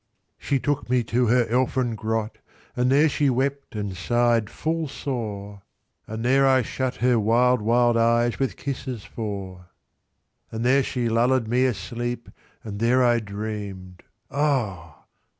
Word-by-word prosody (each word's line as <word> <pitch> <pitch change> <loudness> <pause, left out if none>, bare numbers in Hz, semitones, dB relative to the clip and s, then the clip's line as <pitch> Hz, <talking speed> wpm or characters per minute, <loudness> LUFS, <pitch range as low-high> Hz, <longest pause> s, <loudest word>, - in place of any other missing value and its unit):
VIII.She 140 - 0
took 145 -1 -2
me 125 -1 +2
to 120 +2 +1
her 120 +1 +3
elfin 125 0 0
grot, 110 0 -3 0.4
And 125 +1 +1
there 145 +3 +5
she 145 -1 +1
wept, 135 +1 -2
and 100 -3 -3
sigh'd 115 +4 +1
fill 160 0 -2
sore, 105 -8 -5 0.5
And 110 +2 -5
there 135 +2 +4
I 130 -1 +4
shut 130 +3 -3
her 125 -2 +4
wild 120 +3 +3
wild 120 +2 +3
eyesWith 120 +3 +2
kisses 130 -5 -5
four. 95 -5 -6 0.8
IX.And 115 +1 -4
there 135 +3 +4
she 125 -2 -2
lulled 115 +1 +2
me 125 +3 +2
asleep, 120 0 -3 0.3
And 100 -2 -6
there 125 +3 +3
I 120 -1 +4
dream'd—Ah! 100 - -4
120 Hz, 135 wpm, -24 LUFS, 110-130 Hz, 0.8 s, there